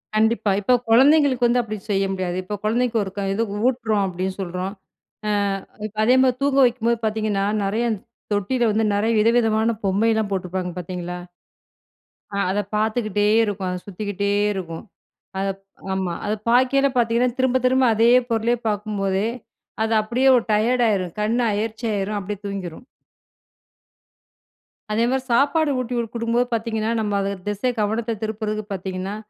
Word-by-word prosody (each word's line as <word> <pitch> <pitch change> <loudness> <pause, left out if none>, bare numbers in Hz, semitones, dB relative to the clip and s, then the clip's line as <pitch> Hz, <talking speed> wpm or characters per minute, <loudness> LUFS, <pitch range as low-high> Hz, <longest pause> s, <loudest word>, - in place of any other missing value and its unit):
கண்டிப்பா. 220 -1 +2
இப்போ 250 +5 +2 0.2
கொழந்தைங்களுக்கு 265 0 +5
வந்து 245 +1 +3
அப்டி 215 -2 -5
செய்ய 195 0 +2
முடியாது. 185 -2 -2
இப்போ 205 +3 -4
குழந்தைக்கு 235 +2 +1
ஒரு 190 - -6
க - - -1
இது 225 +3 0 0.2
ஊட்டுறோம் 225 -5 +1
அப்டின்னு 185 +1 -3
சொல்றோம், 185 +2 -4 0.9
அ - - -16 0.2
இப்ப 215 +1 -18
அதே 250 +2 +5
மாரி 255 -1 +3
தூங்க 275 -1 +2
வைக்கும்போது 235 -1 +1
பாத்தீங்கன்னா 215 -2 0 0.2
நெறைய, 215 +4 0
இந் 210 - -3 0.3
தொட்டில 235 +4 +1
வந்து 220 +1 +1
நெறைய 220 +3 +1
விதவிதமான 225 0 +3
பொம்மைலாம் 215 +2 +1
போட்டிருப்பாங்க 180 -1 -2
பாத்தீங்களா 180 0 -5 1.2
ஆ - - -1
அதை 205 +1 0
பாத்துக்கிட்டே 215 -1 0 0.2
இருக்கும். 195 -2 -3
அது 180 - -4
சுத்திக்கிட்டே 200 +1 -2 0.2
இருக்கும். 170 -4 -6 0.6
அதை 195 0 0 0.4
ஆமா. 190 -2 -2
அதை 215 +1 0
பாக்கயில 260 +3 +4
பாத்தீங்கன்னா, 235 +1 +2
திரும்ப 260 0 +2
திரும்ப 260 +1 +3
அதே 230 +2 +4 0.2
பொருளையே 230 +1 +1
பாக்கும்போதே, 205 -1 -1 0.6
அது 225 +1 0
அப்படியே 250 +5 +1
ஒரு 235 - +1
டயர்டா 235 +3 +3
ஆயிரும் 185 -4 -1
கண் 220 +3 +1 0.2
அயர்ச்சி 220 +2 -3
ஆயிரும் 205 +1 -2
அப்டியே 200 +1 -5
தூங்கிரும். 195 +1 -6 2.1
அதேமாரி 240 +4 +1
சாப்பாடு 290 +4 +3
ஊட்டி 250 0 -3
குடு 235 - 0
குடுக்கும்போது 235 +1 0
பாத்தீங்கன்னா 225 -1 -1
நம்ம 205 -2 0
அது 195 0 -1 0.2
திசை 205 +5 -1
கவனத்த 220 +1 -1
திருப்புறதுக்கு 215 -1 -3
பாத்தீங்கன்னா 190 +1 -4
215 Hz, 145 wpm, -22 LUFS, 195-235 Hz, 2.1 s, கொழந்தைங்களுக்கு